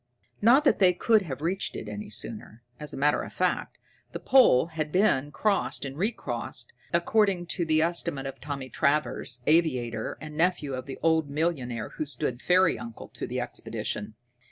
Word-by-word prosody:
Not 245 Hz, +7 st, +6 dB
that 295 Hz, -, +3 dB
they 185 Hz, -2 st, +6 dB
could 215 Hz, +4 st, +3 dB
not 190 Hz, -, -8 dB
have 135 Hz, -1 st, -5 dB
reached 185 Hz, +4 st, -1 dB
it 105 Hz, 0 st, -6 dB
sooner. 110 Hz, +1 st, -6 dB, 0.2 s
As 150 Hz, -1 st, -3 dB
a -, -, -6 dB
matter 145 Hz, +2 st, +2 dB
of -, -, -7 dB
fact, -, -, -1 dB, 0.4 s
the -, -, -4 dB
pole 255 Hz, -, +5 dB
had 155 Hz, -1 st, -2 dB
been 150 Hz, -7 st, +2 dB
crossed 200 Hz, -1 st, 0 dB
and 135 Hz, 0 st, -6 dB
re 200 Hz, +9 st, +1 dB
crossed, 470 Hz, -, -5 dB, 0.2 s
according 185 Hz, +1 st, +2 dB
to 175 Hz, -, -1 dB
the 155 Hz, 0 st, +3 dB
estimate 170 Hz, -4 st, -1 dB
of 135 Hz, 0 st, -7 dB
Tommy 140 Hz, -3 st, -5 dB
Travers, 140 Hz, -3 st, 0 dB
aviator, 125 Hz, -9 st, +1 dB
and 150 Hz, -1 st, -9 dB
nephew 160 Hz, -4 st, +1 dB
of 130 Hz, +1 st, -5 dB
the 135 Hz, -, -6 dB
old 160 Hz, -2 st, +2 dB
millionaire 140 Hz, -7 st, -2 dB
who 155 Hz, -, -4 dB
stood 135 Hz, -4 st, -2 dB
fairy 180 Hz, 0 st, +3 dB
uncle 115 Hz, -1 st, -9 dB
to -, -, -6 dB
the -, -, -3 dB
expedition. 105 Hz, +1 st, -4 dB
150 Hz, 180 wpm, -27 LUFS, 130-180 Hz, 0.4 s, Not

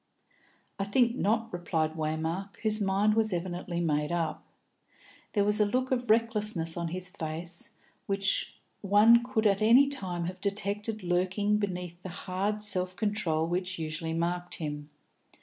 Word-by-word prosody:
"I -, -, +1 dB
think 235 Hz, +3 st, +2 dB
not," 225 Hz, -1 st, 0 dB
replied 165 Hz, -3 st, -1 dB
Waymark, 160 Hz, +5 st, -3 dB
whose 215 Hz, -1 st, 0 dB
mind 200 Hz, +2 st, +2 dB
was 220 Hz, 0 st, +1 dB
evidently 175 Hz, 0 st, -3 dB
made 150 Hz, -2 st, 0 dB
up. 170 Hz, -1 st, -2 dB, 0.9 s
There 205 Hz, -, +3 dB
was 210 Hz, +1 st, +1 dB
a 210 Hz, -, +5 dB
look 255 Hz, +5 st, -1 dB
of 245 Hz, -3 st, -1 dB
recklessness 210 Hz, -7 st, +3 dB
on 170 Hz, -1 st, -2 dB
his 180 Hz, +2 st, -4 dB
face 170 Hz, -1 st, -5 dB, 0.4 s
which 195 Hz, 0 st, 0 dB, 0.3 s
one 215 Hz, +4 st, +6 dB
could 240 Hz, -3 st, -1 dB
at 200 Hz, 0 st, +3 dB
any 240 Hz, +6 st, +6 dB
time 180 Hz, -11 st, -1 dB
have 185 Hz, +2 st, -6 dB
detected 205 Hz, +1 st, -3 dB
lurking 185 Hz, +4 st, +1 dB
beneath 180 Hz, -3 st, -4 dB
the 185 Hz, -, -7 dB
hard 195 Hz, +4 st, -3 dB
self 185 Hz, -3 st, +2 dB
control 185 Hz, -6 st, 0 dB
which 180 Hz, +2 st, -2 dB
usually 160 Hz, 0 st, -3 dB
marked 175 Hz, +2 st, -1 dB
him. 150 Hz, -2 st, -5 dB
190 Hz, 150 wpm, -29 LUFS, 170-210 Hz, 0.9 s, one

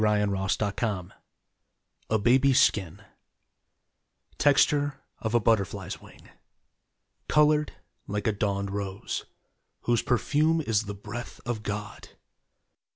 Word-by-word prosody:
DAY 105 Hz, -1 st, +3 dB
DREAMS 95 Hz, -1 st, 0 dB, 1.5 s
A 110 Hz, -, +3 dB
BABY'S 130 Hz, +5 st, +4 dB
SKIN 95 Hz, -6 st, +1 dB, 1.4 s
Texture 145 Hz, 0 st, +3 dB, 0.2 s
of 110 Hz, +1 st, -2 dB
a -, -, +6 dB
butterfly's 105 Hz, -4 st, 0 dB
wing, -, -, -16 dB, 1.0 s
Colored 150 Hz, 0 st, +3 dB, 0.3 s
like 105 Hz, 0 st, -3 dB
a 110 Hz, -, +3 dB
dawned 100 Hz, -1 st, -1 dB
rose, 100 Hz, -1 st, -4 dB, 0.6 s
Whose 120 Hz, -2 st, +2 dB
perfume 150 Hz, +6 st, +2 dB
is 115 Hz, -7 st, 0 dB
the 100 Hz, 0 st, -5 dB
breath 105 Hz, +4 st, -8 dB
of 120 Hz, -3 st, -2 dB
God. 105 Hz, -1 st, -6 dB
110 Hz, 100 wpm, -27 LUFS, 100-135 Hz, 1.5 s, a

